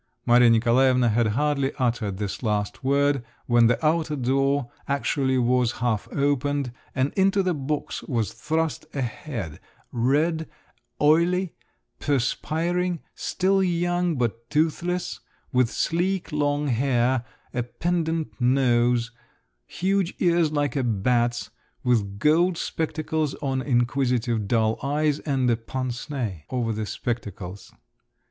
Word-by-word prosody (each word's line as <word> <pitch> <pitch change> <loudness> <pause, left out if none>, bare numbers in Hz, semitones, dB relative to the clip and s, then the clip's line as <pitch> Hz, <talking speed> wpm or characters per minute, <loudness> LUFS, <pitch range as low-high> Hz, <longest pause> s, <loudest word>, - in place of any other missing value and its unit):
Maria 120 0 +6
Nikolaevna 120 +2 +4
had 115 +1 +2
hardly 140 +4 0
uttered 115 -6 -1
this 100 -1 -4
last 105 -2 -2
word 140 -1 +2 0.2
when 120 -1 +5
the 120 - +3
outer 155 -1 +1
door 135 0 +1 0.2
actually 140 -1 0
was 125 -1 +2
half 115 -3 -1
opened, 140 -1 0 0.2
and 135 +2 0
into 195 0 +3
the 185 -1 +1
box 150 0 -3
was 115 -5 -1
thrust 160 0 -2
a 135 - -1
head—red, 135 - -2 0.5
oily, 170 +4 +3 0.5
perspiring, 165 +6 0
still 195 +1 +1
young, 175 -1 +1
but 115 -2 -2
toothless; 170 +3 0 0.3
with 125 -2 +3
sleek 180 +6 -1
long 145 0 0
hair, 125 0 +1 0.3
a 125 - 0
pendent 165 +5 -1
nose, 120 -2 +3 0.6
huge 190 -1 0
ears 170 -3 +2
like 145 -4 0
a 140 - +1
bat's, 120 +2 0 0.3
with 105 -5 +1
gold 165 - +3
spectacles 155 -2 -2
on 135 -2 -2
inquisitive 120 -3 0
dull 110 0 +1
eyes, 150 +1 +1
and 135 -4 0
a - - +3
pince 125 +3 -5
nez 115 - -3
over 120 -3 -1
the 110 0 -3
spectacles. 100 -6 -5
135 Hz, 120 wpm, -25 LUFS, 120-155 Hz, 0.6 s, Maria